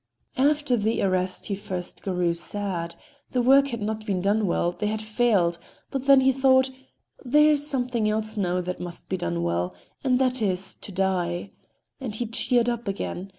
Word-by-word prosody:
After 290 -1 +3
the 220 +1 0
arrest 185 -1 0
he 205 - -3
at 195 - -4
first 185 -3 -6
grew 180 -3 0
sad; 175 -1 -2 0.4
the 250 - +2
work 275 +2 +6
had 235 -5 -4
not 215 +1 -3
been 195 -4 -1
done 205 +3 +1
well, 175 0 +1
they 210 +4 -3
had 215 +1 -1
failed; 215 -6 +1 0.3
but 270 0 -3
then 275 -1 +7
he 265 0 +4
thought: 265 0 +3 0.5
"There 300 +4 +5
is 290 -1 +2
something 245 -5 0
else 215 0 -2
now 180 -3 0
that 180 +1 -5
must 175 -1 -7
be 190 - -1
done 85 - -2
well—and 90 - -2
that 255 -1 +1
is, 190 -2 0
to - - -11
die," 185 -1 -1 0.5
and 245 -6 -5
he 240 - -2
cheered 240 +1 +1
up 235 -1 -2
again. 195 -1 -4
210 Hz, 185 wpm, -25 LUFS, 180-250 Hz, 0.5 s, then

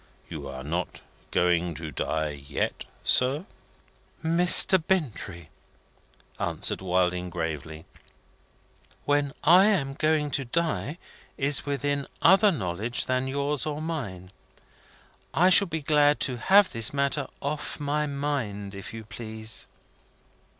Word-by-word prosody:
You 75 -4 -7
are 65 -1 -7
not 85 +5 -4 0.3
going 85 -1 +1
to 80 0 -6
die 80 -1 -2
yet, 70 -1 -4 0.2
sir." 135 +7 +3 0.8
"Mr. 175 +2 +5
Bintrey," 110 - -2 0.9
answered - - -1
Wilding, 90 -1 0
gravely, 80 -2 -5 1.2
"when 145 -1 +1
I 180 +5 +7
am 165 -11 +1
going 155 0 +1
to 140 - -1
die 160 +3 -2 0.4
is 140 +1 +1
within 140 0 -1
other 195 +4 +6
knowledge 110 - -2
than 130 +1 -1
yours 140 +2 -1
or 150 -1 -3
mine. 110 - -5 1.0
I 180 +3 +5
shall 200 +1 +6
be 160 -2 -4
glad 150 0 +3
to 125 -3 0
have 195 +9 +5
this 115 -2 +1
matter 140 0 0
off 150 +2 -4
my 150 +1 -1
mind, 135 -9 -3
if 100 +2 -8
you 110 - -7
please." 110 -1 -5
135 Hz, 120 wpm, -26 LUFS, 90-150 Hz, 1.2 s, I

